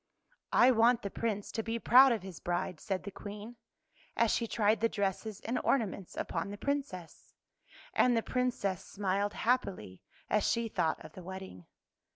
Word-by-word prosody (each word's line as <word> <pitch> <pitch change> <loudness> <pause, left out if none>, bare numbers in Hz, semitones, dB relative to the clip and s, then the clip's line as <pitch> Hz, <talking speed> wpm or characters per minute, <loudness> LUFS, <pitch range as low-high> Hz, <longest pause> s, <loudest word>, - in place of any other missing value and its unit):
" - - -43 0.2
I - - +7
want 235 0 +4
the 200 - -4
Prince 210 -2 -2
to 225 - -2
be 225 +1 -2
proud 255 +3 +7
of 220 -5 -1
his 190 -4 -8
bride," 175 -1 -2
said 190 -2 -3
the 200 - -6
Queen, 210 +4 -9 0.6
as 230 -1 +3
she 230 - 0
tried 215 -1 +2
the 230 - +3
dresses 200 0 -2
and 245 +3 -2
ornaments 205 -7 -1
upon 165 +3 -2
the 205 - -6
Princess. 270 - -4 0.6
And 245 -2 +4
the 225 - +1
Princess 240 -8 -1
smiled 200 +1 -1
happily 200 - -1 0.3
as 210 -1 +2
she 230 -1 +1
thought 160 -6 -1
of - - -11
the 185 - -9
wedding. 190 - -9
210 Hz, 175 wpm, -32 LUFS, 190-235 Hz, 0.6 s, I